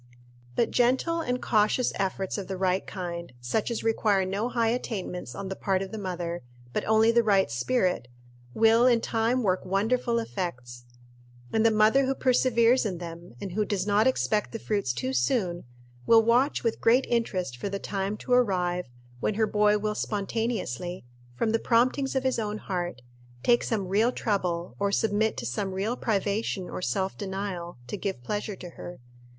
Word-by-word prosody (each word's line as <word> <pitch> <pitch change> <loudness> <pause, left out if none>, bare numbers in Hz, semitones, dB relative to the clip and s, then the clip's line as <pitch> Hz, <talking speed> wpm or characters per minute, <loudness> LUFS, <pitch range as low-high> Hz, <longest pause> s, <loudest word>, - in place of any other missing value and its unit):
But 235 - +1
gentle 265 +8 +2
and 250 -4 -1
cautious 215 +3 +2
efforts 195 -1 -2
of 195 - -6
the 190 - -4
right 185 0 0
kind 170 -4 -5
such 125 - -1
as 235 - -3
require 215 -4 +2
no 200 +6 -1
high 230 -2 +1
attainments 190 - -4
on 200 - -5
the 190 - -4
part 190 -1 0
of 190 - -8
the 220 - -5
mother, 175 -3 -4 0.3
but - - -1
only 220 +1 +4
the 235 0 +4
right 200 - +3
spirit 180 - 0 0.5
will 225 +2 +5
in 240 -2 +5
time 230 +2 0
work 185 -2 +1
wonderful 230 +6 +1
effects; 125 - -4 0.7
and 220 - +3
the 225 - +6
mother 220 +5 +4
who 270 - 0
perseveres 250 -1 +3
in 195 -5 -2
them, 170 -5 -9
and 195 - -5
who 210 +4 0
does 200 -3 -1
not 210 +3 +3
expect 215 -5 0
the - - -2
fruits 205 - -1
too 125 +2 -3
soon, 175 - 0 0.4
will 225 -1 +7
watch 245 +5 +2
with 230 -2 -1
great 245 +4 +4
interest 190 - -1
for 160 +11 -4
the 200 - -2
time 200 +1 -3
to 250 - -2
arrive 180 - +2 0.3
when 205 - 0
her 220 +1 +3
boy 210 0 +3
will 210 0 -1
spontaneously, 200 - -3 0.3
from 220 - 0
the 225 - +2
promptings 255 +4 +2
of 265 - +1
his 260 -2 +1
own 210 -1 -2
heart, 175 - -4 0.4
take 240 0 +4
some 205 -5 -1
real 215 +6 +3
trouble, 180 -7 -2
or 200 0 +1
submit 220 -1 +1
to 125 - -4
some 190 - -2
real 210 +6 -1
privation 200 -3 -1
or - - -5
self 190 +7 -1
denial, 190 -4 -4
to 125 - -5
give 190 -10 -4
pleasure 205 - -3
to 180 -2 -9
her. 175 +1 -9
205 Hz, 180 wpm, -27 LUFS, 185-230 Hz, 0.7 s, will